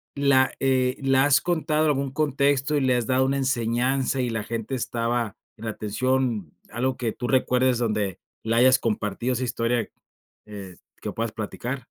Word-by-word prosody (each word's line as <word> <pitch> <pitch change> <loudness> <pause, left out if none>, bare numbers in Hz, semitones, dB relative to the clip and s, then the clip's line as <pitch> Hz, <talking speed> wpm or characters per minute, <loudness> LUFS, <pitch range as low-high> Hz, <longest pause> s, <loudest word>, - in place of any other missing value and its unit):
La, 140 -2 +3
eh, 130 -1 +1
¿la 135 -1 +3
has 140 0 +5
contado 155 -3 0
en - - +3
algún 140 -1 -1
contexto, 140 0 +1
y 145 - +2
le 130 -1 +3
has 120 - -1
dado 130 +1 +3
una 135 +1 0
enseñanza, 130 +1 0
y 125 -1 0
la 110 -2 -2
gente 115 +3 -4
estaba 120 -2 -2 0.2
en 115 0 -10
atención? 110 - -1 0.2
¿Algo 125 +3 -1
que 115 -3 -2
tú 120 - -4
recuerdes, 130 -1 +2
donde 105 -5 -1 0.2
la 115 +1 0
hayas 130 +2 +6
compartido, 115 +1 -2
esa 125 +1 -1
historia, 120 -1 0 0.6
eh, 100 -4 -9 0.3
que - - -4
puedas 115 -1 -2
platicar? 120 +4 -4
125 Hz, 170 wpm, -25 LUFS, 115-135 Hz, 0.6 s, hayas